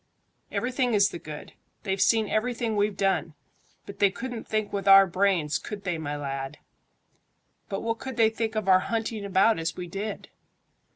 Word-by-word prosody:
"Everything 250 -1 0
is 200 0 +4
the 170 - -7
good. 150 -2 -9 0.3
They've 195 -2 -1
seen 220 -2 +3
everything 230 +1 -1
we've 205 -1 0
done, 190 -5 0 0.5
but 200 - -10
they 200 - +5
couldn't 245 +3 -6
think 215 -1 -2
with 200 -1 -3
our 195 0 +9
brains, 180 -5 +1
could 205 -2 -7
they, 175 -4 -2
my 145 -1 -4
lad?" 135 0 -5 1.1
"But 195 -2 -3
what 230 0 -2
could 265 -2 -6
they 225 -1 +4
think 225 0 -3
of 215 -3 -2
our 185 -1 +6
hunting 225 +1 -3
about 200 +1 +3
as 165 0 -2
we 180 - -4
did?" 195 +5 -6
200 Hz, 175 wpm, -26 LUFS, 180-225 Hz, 1.1 s, our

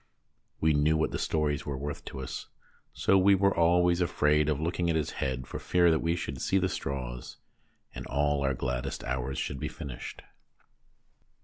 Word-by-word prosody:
We 80 0 +3
knew 75 +2 +3
what 80 - +1
the - - -3
stories 75 -2 0
were 70 -2 -4
worth 70 +1 -5
to 65 - -6
us, 65 - -6 0.4
so 95 - +3
we 100 +1 +6
were 100 +1 +2
always 85 +1 +4
afraid 75 -3 +2
of 75 -2 0
looking 85 +2 -1
at 80 - +2
his 80 -2 0
head 65 -1 -3
for - - -6
fear 85 -1 +3
that 80 - +2
we 85 +1 +1
should 70 -6 -5
see 95 - +2
the 95 -1 +1
straws 60 -6 -5 0.6
and - - -7
all 75 +1 +1
our 65 -1 +1
gladdest 65 +1 -3
hours 65 +1 -2
should 70 - -3
be - - -2
finished. 70 -4 -7
75 Hz, 185 wpm, -29 LUFS, 65-85 Hz, 0.6 s, we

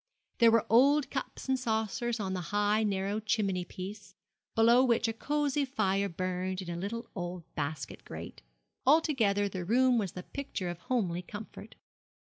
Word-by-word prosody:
There 230 -1 +7
were 225 -1 +4
old 275 +6 +4
cups 270 0 -5
and 265 -1 +1
saucers 230 0 -1
on 190 -2 -2
the 185 - -2
high, 205 +1 +2
narrow 200 0 0
chimney 205 -4 0
piece, 200 +3 -8 0.4
below 235 +3 +6
which 235 -2 +3
a 225 - -1
cosy 290 +3 0
fire 200 -7 0
burned 185 +1 -2
in 175 - -6
a 170 - -5
little 230 +4 -4
old 175 -2 -5
basket 145 -4 -4
grate. - - -8 0.4
Altogether 250 -9 +3
the 185 -2 -4
room 245 +5 +4
was 195 -5 -2
the 180 - -7
picture 265 -10 -5
of 175 -1 -5
homely 180 -7 -1
comfort. 210 +4 -9
210 Hz, 160 wpm, -31 LUFS, 185-240 Hz, 0.4 s, There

